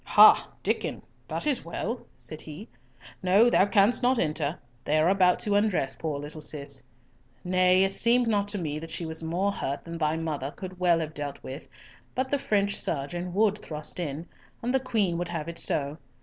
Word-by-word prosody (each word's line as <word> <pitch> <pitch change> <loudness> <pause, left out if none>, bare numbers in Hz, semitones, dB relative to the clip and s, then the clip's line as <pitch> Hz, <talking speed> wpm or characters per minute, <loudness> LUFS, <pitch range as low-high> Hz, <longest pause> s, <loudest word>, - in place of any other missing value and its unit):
"Ha, - - +7 0.2
Diccon, - - -1 0.2
that - - -3
is 290 -4 0
well," 215 +8 -4 0.2
said 155 -1 -7
he. 160 +8 -9 0.5
"No, 200 +6 +5
thou 195 - +5
canst 205 +3 +4
not 255 +1 +3
enter. 155 -3 -1 0.3
They 150 - +1
are 155 +3 +4
about 185 -2 +4
to 205 - 0
undress 205 -10 +1
poor 155 -3 -3
little 150 +2 -7
Cis. 140 -2 -2 0.6
Nay, 185 +1 +4
it 195 0 +1
seemed 240 +2 +3
not 205 -2 +1
to 205 0 -3
me 155 -4 -3
that 165 +1 -8
she 165 +1 -3
was 160 0 -2
more 175 +5 0
hurt 140 -8 -4
than 170 0 -6
thy 155 0 +1
mother 150 -4 -3
could 185 +3 -9
well 175 -2 +3
have 155 -1 -4
dealt 145 -2 -5
with, 135 +4 -8 0.5
but 260 +1 -1
the 285 - +2
French 200 -4 +1
surgeon 175 +5 -3
would 210 0 +3
thrust 155 0 -4
in, 160 0 -4 0.4
and 245 +2 0
the 265 - +4
Queen 210 -9 0
would 175 - -2
have 160 -2 -4
it 170 0 -3
so. 145 +2 -1
175 Hz, 195 wpm, -27 LUFS, 155-205 Hz, 0.6 s, Ha